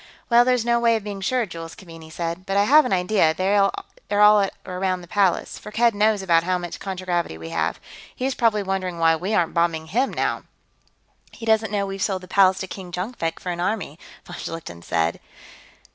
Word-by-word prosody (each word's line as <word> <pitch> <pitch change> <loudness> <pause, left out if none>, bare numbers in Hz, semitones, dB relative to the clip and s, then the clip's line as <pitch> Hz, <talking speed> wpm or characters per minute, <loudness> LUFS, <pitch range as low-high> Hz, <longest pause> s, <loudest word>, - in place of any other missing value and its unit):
"Well, 235 +1 +7
there's 250 -2 +1
no 235 0 +2
way 230 -1 +3
of 220 - -3
being 200 -1 -6
sure," 245 +4 0
Jules 165 -3 -8
Keaveney 165 -4 -12
said, 170 +3 -5
"but 195 0 0
I 200 - +5
have 295 +7 +6
an - - -2
idea 180 -3 +2
they're 200 +2 +2
all 210 - +2
at 195 -1 +1
or 180 -1 -6
around 185 -1 -1
the 175 - -12
Palace. 195 -1 0
Firkked 230 +2 +1
knows 210 -1 +2
about 165 -3 +3
how 180 +1 0
much 175 -1 -6
contragravity 180 - -3
we 80 0 -8
have. - - -1 0.4
He's 260 +1 -1
probably 225 -4 +1
wondering 190 -2 -3
why 165 -1 +4
we 190 +6 -2
aren't 170 -5 +1
bombing 165 -2 0
him, 250 +8 +1
now." - - -1 0.9
"He 225 - -10
doesn't 220 -1 +2
know 200 -1 0
we've 195 0 -6
sold 190 -2 -1
the - - -10
Palace 190 -1 +4
to 190 - -4
King 185 -1 -9
Jonkvank 180 -3 -3
for 180 - -4
an 175 - -5
army," 175 -4 -2 0.3
von 175 - -9
Schlichten 155 - -7
said. 80 0 -1
190 Hz, 205 wpm, -23 LUFS, 175-215 Hz, 0.9 s, Well